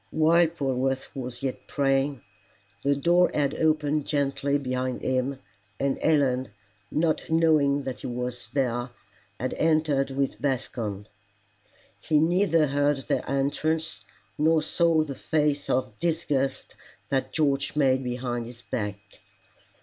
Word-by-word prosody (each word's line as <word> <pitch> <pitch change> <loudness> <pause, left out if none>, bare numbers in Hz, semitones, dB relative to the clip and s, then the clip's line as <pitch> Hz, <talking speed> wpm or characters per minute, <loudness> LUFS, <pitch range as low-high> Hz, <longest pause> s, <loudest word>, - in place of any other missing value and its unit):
While 165 +2 +4
Polwarth 135 -4 -2
was 125 -1 -6
yet 130 -2 -4
praying, 135 -1 0 0.6
the 140 0 +2
door 175 +5 +4
had 145 -1 +1
opened 155 -2 +1
gently 140 -1 0
behind 130 -2 -3
him, 130 +1 0 0.4
and 140 -1 0
Helen, 135 -5 +2 0.4
not 155 0 0
knowing 155 -4 +3
that 130 -1 -5
he - - -6
was 125 0 -4
there, 125 -3 0 0.5
had - - -2
entered 155 -4 +2
with 135 -2 -2
Bascombe. 115 -7 -2 0.9
He 155 - +1
neither 165 0 +3
heard 145 0 +1
their - - -1
entrance, 155 +4 -1 0.4
nor 160 +1 +3
saw 165 0 +3
the 145 -3 -5
face 145 0 0
of 130 0 -1
disgust 145 -5 -1 0.3
that 135 -1 0
George 140 -3 0
made 135 -3 +3
behind 120 -1 -3
his 120 0 -12
back. 105 -3 -3
140 Hz, 125 wpm, -26 LUFS, 130-155 Hz, 0.9 s, While